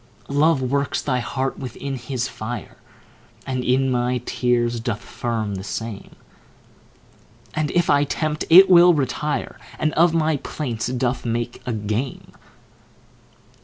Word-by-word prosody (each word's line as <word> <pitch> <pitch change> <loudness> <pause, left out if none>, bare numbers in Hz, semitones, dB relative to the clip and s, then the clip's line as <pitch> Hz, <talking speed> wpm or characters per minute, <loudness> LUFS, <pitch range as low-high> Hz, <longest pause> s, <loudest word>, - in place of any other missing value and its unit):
Love 145 -1 +3
works 140 +2 0
thy 125 -3 -1
heart 130 +2 -3
within 135 +1 -5
his 125 0 -3
fire, 110 -4 -7 0.7
And 130 -1 -2
in 130 +1 +2
my 125 0 +1
tears 120 -1 0
doth 115 -2 -3
firm 115 -4 -3
the 95 -1 -5
same; 110 +1 -6 1.4
And 155 -1 -1
if 175 -1 +1
I 145 0 +4
tempt, 155 +1 -2
it 185 +4 +9
will 175 -1 +7
retire, 145 +1 -2 0.2
And 155 - 0
of 170 +1 +4
my 160 -2 +1
plaints 120 -6 -4
doth 125 0 -1
make 120 0 -3
a 125 - -1
game. 110 +5 -3
130 Hz, 130 wpm, -22 LUFS, 120-150 Hz, 1.4 s, it